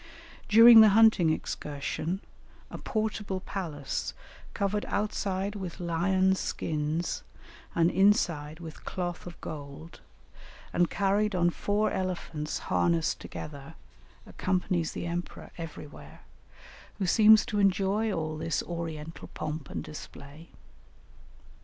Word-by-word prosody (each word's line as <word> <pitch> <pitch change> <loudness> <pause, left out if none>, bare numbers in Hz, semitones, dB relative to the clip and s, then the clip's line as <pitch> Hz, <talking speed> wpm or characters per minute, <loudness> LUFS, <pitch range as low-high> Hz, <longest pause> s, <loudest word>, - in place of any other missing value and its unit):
During 230 +1 +10
the 215 - +8
hunting 220 -7 +6
excursion, 155 +4 -3 0.5
a - - -7
portable 215 -3 -2
palace, 165 -8 -4 0.4
covered 205 +1 0
outside 200 -1 -2
with 190 -5 -6
lions' 185 +2 +1
skins 155 +2 -2 0.5
and 170 0 +3
inside 170 -7 +2
with 160 -2 -10
cloth 175 -1 -4
of 175 - -10
gold, 150 +2 -8 0.7
and 175 0 +2
carried 200 +1 +1
on 175 -1 +3
four 205 +4 0
elephants 170 -5 -3 0.2
harnessed 170 -2 +1
together, 150 +1 -9 0.5
accompanies 180 -3 -1
the - - -4
emperor 175 +1 -5
everywhere, 165 -3 -10 0.8
who 195 - -1
seems 215 +3 +6
to 210 - -2
enjoy 200 +2 +2
all 155 -3 -3
this 165 0 -1
oriental 165 -2 -6
pomp 155 -2 -5
and - - -4
display. 150 +1 -11
175 Hz, 110 wpm, -29 LUFS, 160-200 Hz, 0.8 s, During